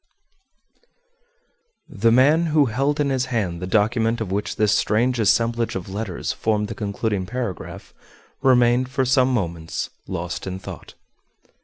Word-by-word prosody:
_ - - -45 1.0
The 115 +3 +1
man 150 +8 +4
who 150 -2 +4
held 135 +5 0
in 140 -2 +1
his 130 -1 0
hand 100 -9 -2
the 90 - -3
document 115 +3 +1
of 110 -5 -4
which 100 +2 -2
this 105 -1 +2
strange 120 +3 +1
assemblage 115 +2 +1
of 95 0 -5
letters 100 -3 -3
formed 105 -1 -1
the - - -3
concluding 100 -2 -2
paragraph 120 -5 -5 0.5
remained 125 -1 +4
for 130 0 0
some 130 0 +3
moments 85 -8 -3 0.2
lost 85 +2 -4
in 95 0 -4
thought. 95 - -10
115 Hz, 145 wpm, -22 LUFS, 100-130 Hz, 1.0 s, man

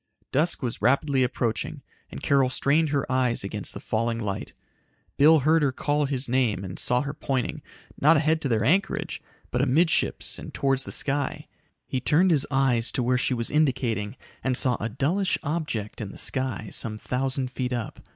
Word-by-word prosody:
Dusk 150 +1 0
was 120 -2 -3
rapidly 140 +1 +2
approaching 120 -2 -2 0.3
and 65 - -9
Carol 135 -2 +3
strained 150 +4 +2
her 140 -2 0
eyes 125 -4 +1
against 100 +1 -3
the - - -5
failing 115 +1 -1
light. 105 -4 -4 0.6
Bill 155 +1 +6
heard 160 +4 +3
her 140 -2 +2
call 145 +3 0
his 135 -1 -1
name 120 -6 +1
and 90 -1 -7
saw 125 0 +3
her 140 0 -4
pointing 135 -4 -2 0.4
not 155 +3 +6
ahead 160 +1 +1
to - - 0
their 110 -4 +1
anchorage, 185 - 0 0.3
but 125 - 0
amidships 155 +6 +2
and - - -8
toward 135 -1 +1
the 130 - -4
sky. 140 -1 -2 0.4
He 130 - -2
turned 165 +8 +3
his 150 -4 +2
eyes 130 -4 +2
to 125 - 0
where 125 +1 +2
she 130 - 0
was 115 -1 -1
indicating 130 -7 0 0.3
and 130 -1 0
saw 125 -4 +3
a 115 - -2
dullish 165 - 0
object 145 -11 -3
in 100 -3 -5
the - - -12
sky, 130 -5 -2
some 110 -1 +2
thousand 130 +2 -2
feet 125 -1 -3
up. 120 -3 -4
130 Hz, 180 wpm, -25 LUFS, 120-145 Hz, 0.6 s, Bill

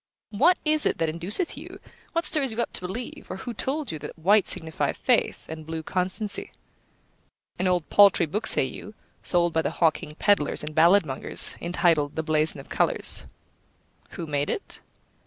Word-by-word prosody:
What 310 - +3
is 305 0 +4
it - - -1
that 165 - 0
induceth 180 - -2
you, - - -10 0.3
what 335 0 0
stirs 280 -6 +1
you 220 - -6
up 235 - -2
to - - -3
believe, 205 +7 -7
or 185 - -5
who 240 +5 -6
told 275 +4 -3
you 155 - -6
that 150 - -9
white 195 +5 +3
signifieth 160 -1 +1
faith, - - 0
and 160 0 -8
blue 160 +1 -6
constancy? 190 +4 -1 1.1
An 185 - +1
old 175 -5 0
paltry 200 -4 +6
book, 205 +8 -3
say - - +3
you, 210 - -9 0.3
sold 175 -2 +1
by 160 - +2
the - - -1
hawking 160 -2 0
pedlars 200 -10 +1
and 150 0 -6
balladmongers, 160 -3 +3
entitled 165 -4 +1
The 160 - -2
Blason 155 -1 0
of 135 - -12
Colours. - - +1 0.9
Who 170 - -5
made 145 -1 -2
it? - - -3
175 Hz, 175 wpm, -25 LUFS, 155-210 Hz, 1.1 s, paltry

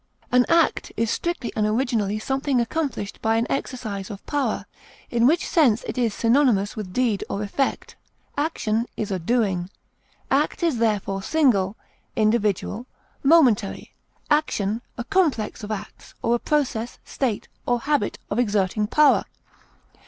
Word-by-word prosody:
effect, - - -30
An 250 0 +5 0.2
act - - -7
is 230 0 +1
strictly 345 -8 -2
and 210 -1 +1
originally 215 -3 0
something 270 +3 0
accomplished 240 -5 -2
by 220 0 +2
an 225 +1 +2
exercise 215 -8 -3
of 200 -1 -9
power, 290 -2 -1 0.5
in 235 0 +4
which 330 +5 +2
sense 250 -9 +3
it - - -4
is 240 -3 +1
synonymous 230 -3 +2
with 210 -4 -6
deed 230 -2 +1
or 200 - -2
effect. 265 +7 -2 0.4
Action 235 -7 0
is 210 -2 -3
a 190 - -1
doing. 190 -3 0 0.6
Act 290 +5 +1
is 315 -9 +1
therefore 205 -3 0
single, 215 -7 +2 0.4
individual, 215 +1 +1 0.3
momentary; 270 -10 +3 0.4
action 225 -8 +1 0.2
a 240 - -3
complex 290 - 0
of 205 - -6
acts, 210 -1 -7
or 230 - +2
a 240 - +2
process, 250 -6 -1
state, 245 -7 -2 0.2
or 245 -1 +1
habit 290 -7 0
of 205 - 0
exerting 210 -2 +1
power. 300 +4 +4
230 Hz, 145 wpm, -24 LUFS, 210-270 Hz, 0.6 s, An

